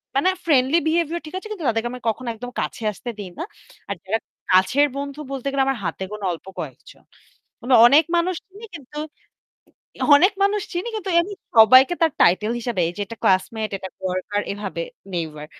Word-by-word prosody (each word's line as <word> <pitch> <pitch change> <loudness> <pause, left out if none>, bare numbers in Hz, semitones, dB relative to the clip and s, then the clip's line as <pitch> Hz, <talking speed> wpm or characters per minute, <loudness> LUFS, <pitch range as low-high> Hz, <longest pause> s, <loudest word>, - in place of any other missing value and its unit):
মানে 280 +7 +3 0.2
friendly 280 -1 +4
behaviour 335 +1 +1
ঠিক 310 - -10
আছে 380 - -7
কিন্তু 370 -8 -5
তাদেরকে 225 +1 -1
আমি 250 - -7
কখনো 240 +3 -4
একদম 245 +3 -8
কাছে - - -4
আসতে 240 +4 -8
দিই 200 -3 -6
না। - - -2 0.5
আর 200 - -2
যারা 210 +4 0 0.3
কাছের 195 +11 +4
বন্ধু 280 +1 -5
বলতে 275 -1 -4
গেলে 275 -1 +2
আমার 270 -2 0
হাতে 190 - -3
গুণা 210 -1 -5
অল্প 165 - -10
কয়েকজন। - - -9 0.6
মানে 255 - 0
অনেক 285 +6 +6
মানুষ 355 +2 +1
চিনি 405 +4 -12
কিন্তু 295 0 -9 1.2
অনেক 370 +8 +4
মানুষ 405 +1 +2
চিনি 360 +6 -3
কিন্তু 405 -3 -4
এমনি 370 +4 0 0.2
সবাইকে 255 - +8
তার 325 -2 +4
title 210 +6 +3
হিসেবে 235 -6 -1
যে - - -6
এটা 230 - -9
classmate, 215 +3 +1
এটা 190 - -7
coworker 185 +2 -2
এভাবে 200 -4 -5 0.3
neighbour 155 -3 -4
255 Hz, 175 wpm, -22 LUFS, 205-320 Hz, 1.2 s, সবাইকে